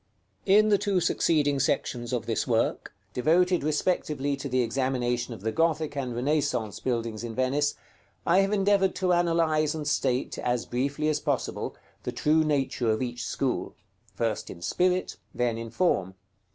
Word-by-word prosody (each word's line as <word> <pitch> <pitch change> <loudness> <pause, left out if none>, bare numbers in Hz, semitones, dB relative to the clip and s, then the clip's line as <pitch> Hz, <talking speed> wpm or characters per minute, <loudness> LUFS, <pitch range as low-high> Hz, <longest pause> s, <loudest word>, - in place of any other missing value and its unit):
§ - - -45 0.4
XXIII. 195 - +6
In 215 0 +5
the 205 -2 +4
two 200 -2 +1
succeeding 145 -4 +2
sections 120 -3 -1
of 120 -3 -1
this - - -1
work, - - 0 0.2
devoted 175 - +3
respectively 150 -2 0
to 140 0 -6
the 130 0 +2
examination 125 -1 -1
of 105 - -13
the 110 +2 -1
Gothic 160 -1 0
and 130 -4 -3
Renaissance 125 -5 0
buildings 115 -3 -2
in 115 -1 -5
Venice, 140 +3 +1 0.5
I 175 +3 +4
have 195 +1 +2
endeavored 195 -2 +2
to 180 -1 +1
analyze 165 -3 +2
and 150 -2 -4
state, 130 -3 0
as 120 -1 -1
briefly 140 +5 -1
as 155 - +1
possible, - - -2 0.3
the - - -4
true 155 +1 +2
nature 135 -5 0
of 110 +3 +1
each 120 -1 -4
school, 135 -2 -2 0.4
first 115 -2 -2
in 85 - -9
Spirit, 180 - 0 0.2
then 120 -2 0
in 115 0 -6
Form. 105 - 0
140 Hz, 165 wpm, -27 LUFS, 120-165 Hz, 0.5 s, XXIII